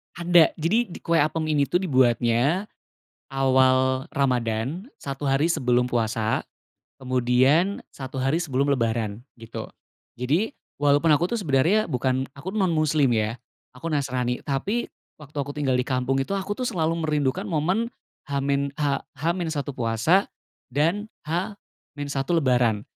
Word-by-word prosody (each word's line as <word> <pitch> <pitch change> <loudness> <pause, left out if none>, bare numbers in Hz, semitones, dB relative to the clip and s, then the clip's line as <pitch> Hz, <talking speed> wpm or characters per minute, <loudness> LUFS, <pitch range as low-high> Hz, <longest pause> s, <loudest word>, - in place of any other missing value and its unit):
Ada. 170 -1 +4
Jadi, 215 +9 +1
di 175 - -9
kue 165 0 +2
apem 155 +2 +1
ini 145 -2 +2
tuh - - -4
dibuatnya 130 - +2 0.7
awal 130 +1 +3
Ramadhan, 130 - -1
satu 140 0 -4
hari 135 +3 +3
sebelum 125 -7 +2
puasa, 115 -2 0 0.6
kemudian 130 +8 +2
satu 130 -1 -6
hari 135 +5 +2
sebelum 140 -4 0
Lebaran 115 -3 -1
gitu. 115 -2 -7 0.5
Jadi, 155 - 0 0.2
walaupun 145 +2 +3
aku 165 +7 +3
tuh 235 - 0
sebenarnya 170 +7 +2
bukan, 130 0 0
aku 185 +7 -6
tuh 215 - -1
non 185 - +3
muslim, 155 -3 +2
ya, 110 +1 0 0.4
aku 150 +6 -6
Nasrani. 130 -4 -1
Tapi 195 - -1 0.3
waktu 150 -1 -13
aku 145 +1 -6
tinggal 135 -3 +1
di 125 - +2
kampung 130 +1 0
itu, 195 +9 -2
aku 195 +1 -3
tuh 250 +3 -2
selalu 165 -1 -1
merindukan 150 -3 0
momen 185 +9 0 0.4
H 140 - -1
min 140 0 0
H 145 -2 0 0.2
H-1 160 -2 -2
puasa 120 - +2 0.4
dan 165 - 0 0.2
H-1 150 -6 -5
Lebaran. 125 -10 +2
140 Hz, 140 wpm, -25 LUFS, 130-165 Hz, 0.7 s, Ada